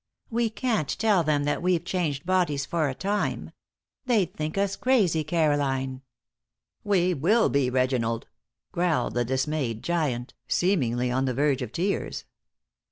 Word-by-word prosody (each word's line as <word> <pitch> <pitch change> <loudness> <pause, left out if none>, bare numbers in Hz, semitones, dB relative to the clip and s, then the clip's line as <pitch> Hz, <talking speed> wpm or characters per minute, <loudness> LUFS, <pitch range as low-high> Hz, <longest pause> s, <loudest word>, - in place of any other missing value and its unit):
We 230 0 +1
can't 220 - -1
tell 210 -6 +3
them 150 -2 +1
that 145 0 -1
we've 175 -1 +1
changed 160 -6 -2
bodies 175 -6 +1
for 155 -2 0
a 130 - -4
time. 205 +6 -2 0.6
They'd 200 -8 +2
think 155 +3 -4
us 195 0 +1
crazy, 195 -12 +2
Caroline." 140 -5 0 0.8
"We 185 -3 +2
will 185 - +3
be, 140 -3 +2
Reginald," 125 -3 0 0.5
growled 170 -8 0
the 120 - +1
dismayed 130 -2 -2
giant, 145 -8 -1
seemingly 125 -10 +1
on 130 +2 +1
the 130 -2 -1
verge 140 0 +1
of 120 -4 -4
tears. 185 +9 -2
155 Hz, 140 wpm, -26 LUFS, 130-185 Hz, 0.8 s, tell